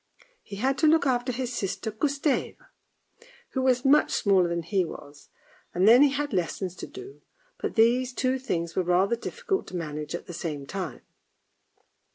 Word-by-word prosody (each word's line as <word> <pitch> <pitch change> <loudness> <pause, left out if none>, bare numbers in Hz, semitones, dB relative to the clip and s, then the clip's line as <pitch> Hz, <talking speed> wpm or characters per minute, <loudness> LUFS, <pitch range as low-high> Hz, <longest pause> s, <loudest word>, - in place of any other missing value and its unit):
He 200 - -9
had 265 +6 0
to 315 - +4
look 320 -1 +4
after 250 -1 +1
his 250 0 -3
sister 220 0 -3
Gustave, 280 +5 -1 0.9
who 265 - -2
was 255 0 +2
much 290 +3 +5
smaller 190 -4 +3
than 170 0 -2
he 190 +2 +1
was, 145 -3 -10 0.5
and 185 +3 +3
then 240 +4 +8
he 290 - +7
had 290 +1 -2
his 195 - 0
lessons 180 +1 -4
to - - -7
do, 390 +1 -11 0.4
but - - -3
these 245 +3 +3
two 260 +1 0
things 170 -10 -3
were - - +2
rather 180 +5 +2
difficult 410 - -3
to 185 - -8
manage 150 -2 -4
at - - -7
the 175 - -9
same 150 -4 -5
time. 185 +2 -5
230 Hz, 180 wpm, -26 LUFS, 175-265 Hz, 0.9 s, then